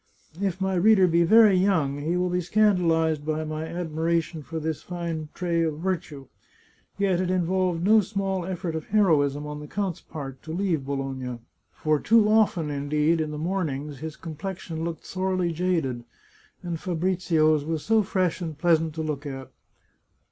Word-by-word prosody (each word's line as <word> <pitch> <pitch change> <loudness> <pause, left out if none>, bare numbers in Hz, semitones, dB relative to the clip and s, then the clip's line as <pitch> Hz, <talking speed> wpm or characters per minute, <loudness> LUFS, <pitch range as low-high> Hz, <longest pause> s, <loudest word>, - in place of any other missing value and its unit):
If 195 -2 -1
my 190 0 0
reader 190 +1 +5
be 170 -1 +3
very 215 +3 +7
young, 165 -7 +2
he 165 +5 -1
will 180 0 0
be 180 0 +1
scandalized 170 -6 +2
by 155 +1 -2
my 155 +1 -4
admiration 165 -1 -1
for 160 +2 -5
this 160 -1 -3
fine 170 -3 -5
trait 170 -2 0
of 155 -2 -1
virtue. 165 -5 -3 0.7
Yet 190 -3 +1
it 180 - -1
involved 185 -1 0
no 215 +3 +6
small 195 -2 -2
effort 175 -2 -4
of 160 -1 -5
heroism 150 -9 +2
on 150 0 -6
the 150 - -8
count's 190 0 -3
part 135 -4 -8
to 160 - -8
leave 170 -6 -1
Bologna. 135 -3 -3 0.3
For 155 -1 0
too 220 +3 +4
often, 205 -8 +2
indeed, 150 +3 +1
in 155 - -2
the 150 - -5
mornings, 150 -5 -3
his 155 +1 -6
complexion 165 0 -6
looked 165 -1 -5
sorely 185 -2 -1
jaded, 160 -8 -1 0.6
and 170 -2 -4
Fabrizio's 165 -4 +1
was 160 0 -3
so 225 0 +4
fresh 185 -4 -1
and 160 -4 -5
pleasant 160 -1 +2
to 160 - -3
look 150 -1 -4
at! 135 -2 -7
165 Hz, 165 wpm, -25 LUFS, 155-185 Hz, 0.7 s, very